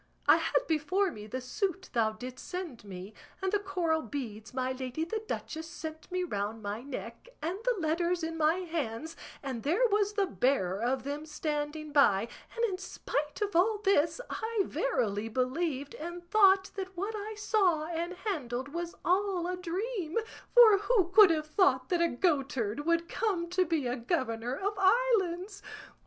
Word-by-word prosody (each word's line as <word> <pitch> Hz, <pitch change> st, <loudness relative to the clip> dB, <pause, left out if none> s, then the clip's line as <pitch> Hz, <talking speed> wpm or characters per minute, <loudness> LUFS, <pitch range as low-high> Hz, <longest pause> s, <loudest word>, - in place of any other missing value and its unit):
I -, -, +8 dB
had -, -, +1 dB
before 340 Hz, +5 st, +1 dB
me 210 Hz, -4 st, -9 dB
the 255 Hz, +4 st, -4 dB
suit 375 Hz, -, -3 dB
thou 220 Hz, -2 st, +2 dB
didst 250 Hz, +4 st, -8 dB
send 350 Hz, -, -5 dB
me, 195 Hz, +1 st, -8 dB, 0.3 s
and 380 Hz, -1 st, -1 dB
the 415 Hz, -, +2 dB
coral 355 Hz, -5 st, 0 dB
beads 225 Hz, -4 st, -6 dB
my 255 Hz, 0 st, -1 dB
lady 260 Hz, +3 st, -3 dB
the 435 Hz, +6 st, -3 dB
duchess 320 Hz, 0 st, -4 dB
sent 315 Hz, -2 st, -8 dB
me 365 Hz, 0 st, 0 dB
round 215 Hz, -, -3 dB
my 205 Hz, +2 st, -3 dB
neck, 280 Hz, -, -7 dB
and 345 Hz, +6 st, -3 dB
the -, -, +2 dB
letters 340 Hz, +2 st, 0 dB
in 325 Hz, 0 st, -2 dB
my 320 Hz, +3 st, +2 dB
hands, 320 Hz, -3 st, -3 dB, 0.3 s
and 260 Hz, -4 st, -4 dB
there 360 Hz, -, +3 dB
was 410 Hz, 0 st, +2 dB
the 405 Hz, -2 st, +2 dB
bearer 220 Hz, -, +1 dB
of 255 Hz, +2 st, 0 dB
them 290 Hz, +3 st, -4 dB
standing 300 Hz, 0 st, -3 dB
by, 230 Hz, -8 st, +4 dB, 0.3 s
and 470 Hz, 0 st, +2 dB
in 380 Hz, -5 st, -2 dB
spite 300 Hz, -5 st, -3 dB
of 410 Hz, -3 st, -3 dB
all 415 Hz, +5 st, +4 dB
this 335 Hz, -4 st, +3 dB
I 445 Hz, -1 st, -1 dB
verily 225 Hz, -, -1 dB
believed 270 Hz, +4 st, -1 dB
and 345 Hz, +2 st, -7 dB
thought 390 Hz, -2 st, +5 dB
that 380 Hz, -2 st, -6 dB
what 400 Hz, +5 st, -2 dB
I 425 Hz, +1 st, -5 dB
saw 380 Hz, -7 st, +2 dB
and 340 Hz, +2 st, -3 dB
handled 280 Hz, -, -3 dB
was 340 Hz, +3 st, -4 dB
all 370 Hz, -1 st, +2 dB
a 365 Hz, +1 st, -1 dB
dream; 365 Hz, 0 st, -3 dB, 0.4 s
for 445 Hz, -5 st, +9 dB
who 410 Hz, -4 st, +2 dB
could 395 Hz, +1 st, +8 dB
have 310 Hz, -2 st, +1 dB
thought 290 Hz, -6 st, +2 dB
that 350 Hz, -2 st, +2 dB
a 340 Hz, -, +3 dB
goatherd 275 Hz, -, 0 dB
would 335 Hz, 0 st, +2 dB
come 355 Hz, -6 st, -1 dB
to 365 Hz, 0 st, +3 dB
be 320 Hz, -4 st, 0 dB
a 245 Hz, +1 st, -1 dB
governor 240 Hz, -2 st, -1 dB
of 400 Hz, +4 st, -1 dB
islands? 395 Hz, -3 st, +2 dB
330 Hz, 175 wpm, -30 LUFS, 265-385 Hz, 0.4 s, for